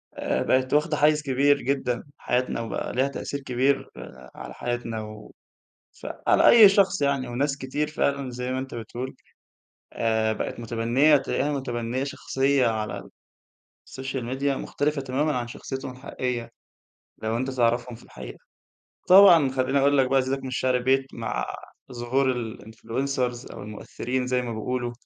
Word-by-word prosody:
آآ -, -, -1 dB
بَقِت 130 Hz, +1 st, +1 dB
واخدة 150 Hz, 0 st, +2 dB
حيّز 150 Hz, 0 st, +4 dB
كبير 140 Hz, +1 st, +2 dB
جدًا 125 Hz, -2 st, -1 dB
في 145 Hz, -, -16 dB
حياتنا 125 Hz, -1 st, -1 dB
وبقى 115 Hz, -, -4 dB
ليها 130 Hz, +2 st, +2 dB
تأثير 140 Hz, 0 st, -5 dB
كبير 135 Hz, +1 st, 0 dB
آآ 65 Hz, 0 st, -11 dB
على -, -, -8 dB
حياتنا 120 Hz, -2 st, -3 dB
و 105 Hz, 0 st, -10 dB, 0.7 s
فعلى -, -, +2 dB
أي 225 Hz, -3 st, +9 dB
شخص 195 Hz, -2 st, +2 dB
يعني 140 Hz, -2 st, 0 dB
وناس 140 Hz, +3 st, -1 dB
كتير 145 Hz, +3 st, -3 dB
فعلًا 140 Hz, -3 st, -1 dB
زي 125 Hz, +1 st, -4 dB
ما 130 Hz, -, -1 dB
أنت 130 Hz, -1 st, -6 dB
بتقول، 120 Hz, +3 st, -6 dB, 0.8 s
آآ 110 Hz, -1 st, +1 dB
بقت 110 Hz, -, -4 dB
مُتبنية 120 Hz, +6 st, +3 dB
تلاقيها 140 Hz, +1 st, -1 dB
مُتبنية 125 Hz, -2 st, -2 dB
شخصية 135 Hz, -1 st, +1 dB
على 110 Hz, -2 st, -2 dB, 0.9 s
الSocial 130 Hz, 0 st, -4 dB, 0.2 s
Media 140 Hz, -, -5 dB
مختلفة 145 Hz, +1 st, -1 dB
تمامًا 135 Hz, +3 st, 0 dB
عن 120 Hz, -1 st, -3 dB
شخصيتهم 135 Hz, +2 st, -6 dB
الحقيقية، 125 Hz, -2 st, -4 dB, 0.7 s
لو 110 Hz, +1 st, 0 dB
أنت 130 Hz, +2 st, -2 dB
تعرفهم 120 Hz, -1 st, 0 dB
في 115 Hz, -, -16 dB
الحقيقة، -, -, -10 dB, 0.7 s
طبعًا 180 Hz, -7 st, +8 dB
خلّيني 130 Hz, +1 st, +1 dB
اقول 140 Hz, +1 st, +3 dB
لَك 130 Hz, -, +4 dB
بقى 135 Hz, -, +4 dB
أزيدَك 135 Hz, +1 st, -1 dB
من 135 Hz, -, -5 dB
الشِعر 130 Hz, 0 st, +1 dB
بيت 135 Hz, +2 st, +2 dB
مع 115 Hz, -1 st, -3 dB, 0.5 s
ظهور 125 Hz, +2 st, 0 dB, 0.2 s
الinfluncers 125 Hz, +3 st, -3 dB
أو -, -, -8 dB
المؤثرين 125 Hz, +4 st, -4 dB
زي 125 Hz, 0 st, 0 dB
ما 120 Hz, -2 st, -4 dB
بيقولوا، 120 Hz, +2 st, -3 dB
130 Hz, 150 wpm, -25 LUFS, 120-140 Hz, 0.9 s, أي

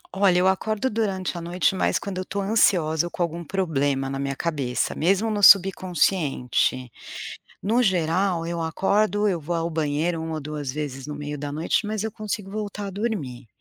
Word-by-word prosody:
Olha, 190 Hz, -2 st, +4 dB
eu 185 Hz, +1 st, +4 dB
acordo 215 Hz, +6 st, 0 dB
durante 195 Hz, -5 st, -1 dB
a -, -, -7 dB
noite, 175 Hz, +3 st, +1 dB
mas 185 Hz, -, +1 dB
quando 190 Hz, -2 st, -5 dB
eu 185 Hz, -, -4 dB
tô 200 Hz, -, -4 dB
ansiosa 175 Hz, -6 st, +2 dB
ou -, -, -7 dB
com 175 Hz, -, -1 dB
algum 170 Hz, +1 st, -3 dB
problema 145 Hz, -7 st, -1 dB
na 135 Hz, -, -3 dB
minha 140 Hz, 0 st, -2 dB
cabeça, 140 Hz, -7 st, -1 dB
mesmo 195 Hz, +7 st, +1 dB
no 205 Hz, -1 st, -1 dB
subconsciente. 175 Hz, -, +3 dB, 0.7 s
No 230 Hz, +5 st, +2 dB
geral 180 Hz, -1 st, +1 dB
eu 170 Hz, -1 st, -3 dB
acordo, 205 Hz, +5 st, +1 dB
eu 180 Hz, -4 st, 0 dB
vou 170 Hz, +3 st, -2 dB
ao 165 Hz, 0 st, -1 dB
banheiro 160 Hz, +2 st, -1 dB
1 160 Hz, 0 st, -4 dB
ou -, -, -3 dB
2 145 Hz, -2 st, -4 dB
vezes 140 Hz, -2 st, -5 dB
no 150 Hz, -, -5 dB
meio 145 Hz, 0 st, -5 dB
da 145 Hz, 0 st, -5 dB
noite, 160 Hz, +7 st, 0 dB
mas 215 Hz, -1 st, -2 dB
eu 220 Hz, -, -3 dB
consigo 210 Hz, -2 st, -5 dB
voltar 205 Hz, -1 st, -4 dB
a -, -, -4 dB
dormir. 160 Hz, -, -4 dB
175 Hz, 190 wpm, -24 LUFS, 150-200 Hz, 0.7 s, Olha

